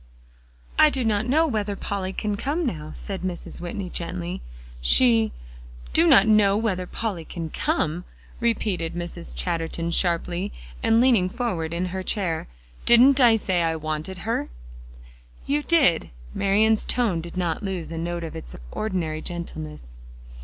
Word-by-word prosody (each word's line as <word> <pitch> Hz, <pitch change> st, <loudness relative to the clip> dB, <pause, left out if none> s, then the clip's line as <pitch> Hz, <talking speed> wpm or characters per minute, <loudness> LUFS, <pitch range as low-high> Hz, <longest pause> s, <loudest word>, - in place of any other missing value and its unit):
"I 310 Hz, -, +8 dB
do 265 Hz, -3 st, -1 dB
not 215 Hz, 0 st, +1 dB
know 310 Hz, +6 st, +4 dB
whether 210 Hz, -7 st, -1 dB
Polly 195 Hz, -1 st, -3 dB
can 210 Hz, +1 st, -2 dB
come 300 Hz, +10 st, -1 dB
now," 155 Hz, -, -3 dB
said 195 Hz, -2 st, -5 dB
Mrs. 180 Hz, -2 st, -4 dB
Whitney 180 Hz, +2 st, -4 dB
gently; 175 Hz, +1 st, -4 dB, 0.4 s
"she" 110 Hz, -, +5 dB, 0.6 s
"Do 170 Hz, -, +4 dB
not 195 Hz, +3 st, +7 dB
know 210 Hz, -2 st, +5 dB
whether 190 Hz, -5 st, -1 dB
Polly 200 Hz, -7 st, -3 dB
can 160 Hz, 0 st, -6 dB
come!" 160 Hz, +3 st, -1 dB, 0.4 s
repeated 205 Hz, -8 st, -1 dB
Mrs. 175 Hz, -, -6 dB
Chatterton 165 Hz, -, -2 dB
sharply, 175 Hz, +2 st, 0 dB, 0.3 s
and 225 Hz, 0 st, +4 dB
leaning 235 Hz, -7 st, +4 dB
forward 185 Hz, -8 st, -2 dB
in 170 Hz, +2 st, -1 dB
her 190 Hz, -, -2 dB
chair. 185 Hz, -4 st, -1 dB, 0.4 s
"Didn't 255 Hz, +4 st, +7 dB
I 240 Hz, -3 st, +7 dB
say 190 Hz, -5 st, 0 dB
I 165 Hz, -1 st, +1 dB
wanted 155 Hz, +3 st, -4 dB
her?" 225 Hz, -, -1 dB, 1.0 s
"You 290 Hz, +2 st, +1 dB
did." 290 Hz, -, +3 dB, 0.2 s
Marian's 215 Hz, +2 st, +3 dB
tone 220 Hz, -9 st, 0 dB
did 170 Hz, +2 st, -9 dB
not 175 Hz, -3 st, -1 dB
lose 190 Hz, -5 st, -4 dB
a 165 Hz, -, -5 dB
note 170 Hz, 0 st, -3 dB
of 165 Hz, -, -6 dB
its -, -, -7 dB, 0.2 s
ordinary 170 Hz, -7 st, -2 dB
gentleness. 75 Hz, -, -6 dB
185 Hz, 145 wpm, -24 LUFS, 165-220 Hz, 1.0 s, I